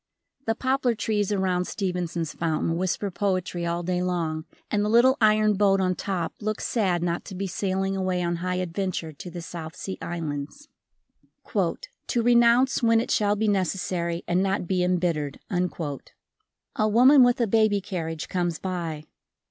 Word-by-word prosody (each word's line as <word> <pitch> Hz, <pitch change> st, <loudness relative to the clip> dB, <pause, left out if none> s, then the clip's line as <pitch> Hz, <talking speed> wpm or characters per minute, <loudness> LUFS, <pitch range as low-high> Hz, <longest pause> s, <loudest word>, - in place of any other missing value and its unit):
The 225 Hz, -, +2 dB
poplar 260 Hz, -1 st, +1 dB
trees 210 Hz, -1 st, -1 dB
around 185 Hz, -3 st, +1 dB
Stevenson's 175 Hz, -5 st, -3 dB
fountain 165 Hz, 0 st, -1 dB
whisper 185 Hz, +3 st, -1 dB
poetry 185 Hz, -2 st, -1 dB
all 170 Hz, +1 st, -2 dB
day 180 Hz, +1 st, -1 dB
long 165 Hz, -3 st, -2 dB, 0.3 s
and 205 Hz, 0 st, +1 dB
the 210 Hz, -, 0 dB
little 240 Hz, +4 st, +5 dB
iron 215 Hz, 0 st, +4 dB
boat 195 Hz, -1 st, +3 dB
on 185 Hz, -1 st, +2 dB
top 180 Hz, -3 st, -3 dB
looks 215 Hz, +1 st, -2 dB
sad 185 Hz, -7 st, +1 dB
not 170 Hz, 0 st, -1 dB
to 190 Hz, -, -8 dB
be 195 Hz, +2 st, -3 dB
sailing 195 Hz, +1 st, -1 dB
away 185 Hz, -2 st, -1 dB
on 175 Hz, 0 st, -1 dB
high 180 Hz, +1 st, -2 dB
adventure 180 Hz, -2 st, -3 dB
to 165 Hz, +5 st, -9 dB
the 175 Hz, -1 st, -7 dB
South 165 Hz, -2 st, -7 dB
Sea 190 Hz, -, -6 dB
islands. 165 Hz, -, -5 dB, 0.9 s
"To 485 Hz, -, -2 dB
renounce 240 Hz, +2 st, +4 dB
when 230 Hz, -1 st, +4 dB
it 230 Hz, -, -2 dB
shall 205 Hz, -1 st, +2 dB
be 215 Hz, +1 st, 0 dB
necessary 180 Hz, -3 st, -1 dB
and 175 Hz, +1 st, +2 dB
not 195 Hz, -1 st, 0 dB
be 180 Hz, 0 st, 0 dB
embittered." 170 Hz, -5 st, 0 dB
A 175 Hz, +3 st, -4 dB
woman 255 Hz, +6 st, +7 dB
with 245 Hz, 0 st, +4 dB
a 235 Hz, -, +3 dB
baby 215 Hz, -1 st, +3 dB
carriage 165 Hz, -5 st, -4 dB
comes 175 Hz, -3 st, -1 dB
by. 170 Hz, -5 st, -4 dB
185 Hz, 160 wpm, -25 LUFS, 170-210 Hz, 0.9 s, woman